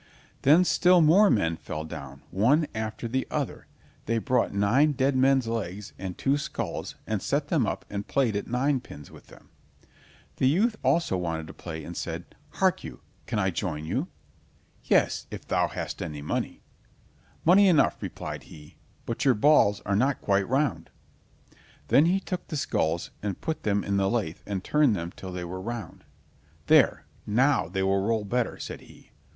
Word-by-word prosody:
Then 160 +7 +6
still 180 0 +4
more 175 +6 +6
men 85 - +1
fell 75 - -6
down, 70 -3 -9
one 125 - +3
after 110 +1 -4
the 130 +3 -2
other; - - -3 0.4
they 115 +1 +1
brought 125 +1 +1
nine 120 +10 +3
dead 135 0 +1
men's 130 -1 +3
legs 105 -3 -4
and 95 -2 -5
two 140 +2 +1
skulls, 115 - -4
and - - -2
set - - -1
them - - +2
up - - -4
and 100 0 -5
played 125 -6 +1
at 100 - -3
ninepins 125 - -2
with - - -15
them. - - -17 0.9
The 130 - +3
youth 210 - +2
also 165 - +2
wanted 80 -3 -3
to 80 - -10
play 80 -2 -7
and 85 +3 -8
said: 85 +1 -5 0.2
"Hark - - +1
you, - - -9 0.3
can 110 - -2
I 95 -2 +1
join 80 -3 -3
you?" - - -2 0.8
"Yes, - - +2
if - - -9
thou - - +2
hast - - -5
any 75 -2 -5
money." - - -3 0.8
"Money 195 +4 +6
enough," 170 -5 +3
replied - - -6
he, 75 -1 -14 0.3
"but 115 - -3
your 130 -3 +4
balls 105 -4 +4
are 100 - -1
not 130 +6 +1
quite 100 0 +1
round." 135 +1 0 1.0
Then 150 +4 +5
he 185 +3 +2
took 180 -2 -5
the 155 - -4
skulls 85 - -1
and 100 -3 -3
put 160 -1 -3
them 100 -1 0
in 100 0 0
the 95 0 +2
lathe 100 -9 -2
and 100 -2 -3
turned 150 -7 +3
them 85 -1 -5
till 95 - -8
they 90 -1 -5
were 95 +2 -6
round. 115 +2 -6 0.6
"There, - - +4 0.2
now, 130 - +2
they 95 +2 -2
will 95 0 +2
roll 110 +1 0
better!" 120 +4 -1
said - - -7
he. - - -18
110 Hz, 175 wpm, -27 LUFS, 95-140 Hz, 1.0 s, Then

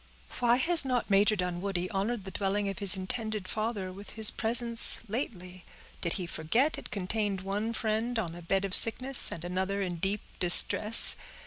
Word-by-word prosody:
"Why 240 -1 0
has 330 +6 +5
not 250 -5 -5
Major 205 +2 +1
Dunwoodie 180 0 -6
honored 205 +3 -5
the 190 - -11
dwelling 200 +2 -5
of 195 - -9
his 200 -1 +1
intended 215 0 -6
father 215 -4 -7
with 200 +2 -14
his 220 -1 +4
presence 235 0 +3
lately? 185 -6 -9 0.4
Did 170 - -3
he 185 - -7
forget 235 - -4
it - - -12
contained 200 0 -5
one 205 +4 -6
friend 225 +1 -5
on 180 -7 -6
a 175 - -13
bed 195 +3 -4
of 195 - -8
sickness, 255 +5 +6
and 170 - -10
another 190 +2 -6
in 180 -3 -6
deep 195 +4 -5 0.2
distress? 210 +5 +6
200 Hz, 175 wpm, -26 LUFS, 185-230 Hz, 0.4 s, sickness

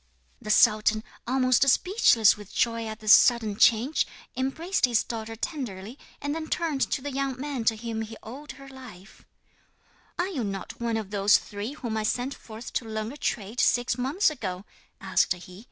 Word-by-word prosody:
The 215 - -8
sultan, 215 0 +4 0.2
almost 255 +1 +3
speechless 260 - +4
with 210 -2 -12
joy 230 -1 0
at 220 0 -7
this 215 -1 +7
sudden 225 -4 +5
change, 235 +8 +3 0.3
embraced 315 +9 0
his 240 -3 +1
daughter 225 -1 -6
tenderly, 230 - -5 0.2
and 285 0 -3
then 320 0 -4
turned 315 -6 -1
to 265 - -2
the 285 - -4
young 270 -1 -2
man 275 -4 -4
to 225 0 +2
whom 225 0 -4
he 220 0 -7
owed 275 +7 -9
her 275 0 -13
life: 250 -8 -13 0.9
'"Are 355 - 0
you 290 -11 -3
not 195 +2 -6
one 230 -1 0
of 210 -3 -5
those 205 0 +5
three 205 +6 -6
whom 235 -7 -4
I - - 0
sent 245 +5 -1
forth 225 -2 -10
to 235 - -2
learn 220 0 -4
a 290 - -10
trade 220 -2 -3
six 245 -1 +2
months 280 - +1
ago?" 195 -9 -5 0.3
asked 190 -2 +1
he. 180 +1 -12
230 Hz, 180 wpm, -26 LUFS, 215-270 Hz, 0.9 s, this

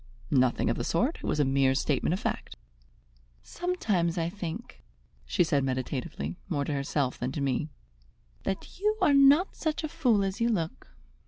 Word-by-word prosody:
"Nothing 130 -2 +3
of - - -2
the - - -2
sort. - - +1
It - - -9
was - - 0
a 145 - +4
mere 135 0 +3
statement 150 +2 +1
of 185 - -1
fact." - - -3 0.9
"Sometimes 205 - -1
I 165 0 0
think," 190 +3 -7 0.5
she 175 - +3
said 145 -4 +1
meditatively, 130 +6 -3
more 145 -5 0
to 150 - -2
herself 140 -1 -1
than 125 +1 -2
to 150 - -3
me, 140 +2 0 0.7
"that 195 - -5
you 425 +2 +1
are 360 -7 +4
not 280 +6 +5
such 315 0 -2
a - - 0
fool 255 -10 +2
as 195 +3 -3
you 235 - +3
look." 170 - -2
170 Hz, 175 wpm, -28 LUFS, -, 0.9 s, not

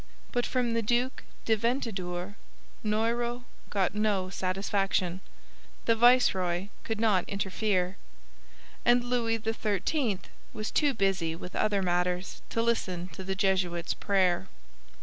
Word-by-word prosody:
But 245 0 0
from 245 -3 0
the 230 - +1
Duc 240 +4 0 0.2
de 225 - +4
Ventadour 205 -6 -2 0.5
Noyrot 235 +3 0 0.3
got 195 -3 +1
no 205 -3 0
satisfaction; 190 -1 0 0.7
the 230 - +4
viceroy 200 -7 +4
could 225 -1 -3
not 210 -5 +3
interfere. 195 -1 0 0.9
And 240 0 +5
Louis 240 -2 +1
XIII 220 - 0 0.4
was 215 0 -4
too 290 -4 +2
busy 190 -6 +1
with 180 +2 -8
other 205 -2 +2
matters 180 +1 0
to 230 - 0
listen 185 -6 -1
to 175 +3 -8
the 190 +1 -2
Jesuit's 185 -3 +1
prayer. 190 -2 +1
200 Hz, 120 wpm, -29 LUFS, 185-230 Hz, 0.9 s, And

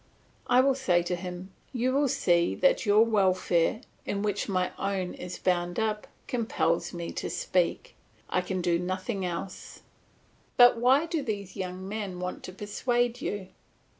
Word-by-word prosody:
I 250 +1 +6
will 270 +1 +3
say 185 -10 +2
to 180 +1 -1
him, 180 +1 -7 0.2
You 255 0 0
will 285 +1 +3
see 175 -8 +2
that 275 -4 +2
your 210 +2 +6
welfare, 190 -2 +2 0.2
in 200 0 -2
which 205 -1 -1
my 185 -1 0
own 195 -2 -2
is 180 0 -7
bound 175 0 0
up, 215 -1 -1 0.2
compels 220 -8 0
me 170 -2 -5
to - - -4
speak; 185 - 0 0.3
I 180 - +1
can 180 0 -3
do 170 -1 +2
nothing 185 +3 -3
else. 180 +2 -6 0.7
But 245 -2 +8
why 265 +6 +4
do 330 -2 -2
these 200 -6 -4
young 185 0 -5
men 200 -3 -4
want 180 0 -4
to - - -7
persuade 240 +5 -1
you? 195 -2 -4
195 Hz, 160 wpm, -28 LUFS, 180-230 Hz, 0.7 s, But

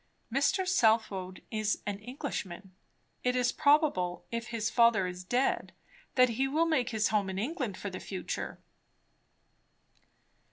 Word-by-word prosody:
"Mr. 370 +8 +2
Southwode 220 - +1
is 215 -1 -1
an 200 -1 -3
Englishman. 210 - -6 0.5
It 250 0 +1
is 250 -1 +2
probable, 285 - +2
if 230 0 -3
his 225 -2 -2
father 230 -5 +4
is 180 0 -5
dead, 245 +8 0 0.4
that 255 -1 +6
he 255 +4 0
will 310 +5 +2
make 285 -7 +1
his 220 -2 +1
home 205 -3 +1
in 190 - -4
England 245 - -2
for 200 - -5
the 185 - -6
future." 190 -2 -5
230 Hz, 135 wpm, -30 LUFS, 195-260 Hz, 0.5 s, that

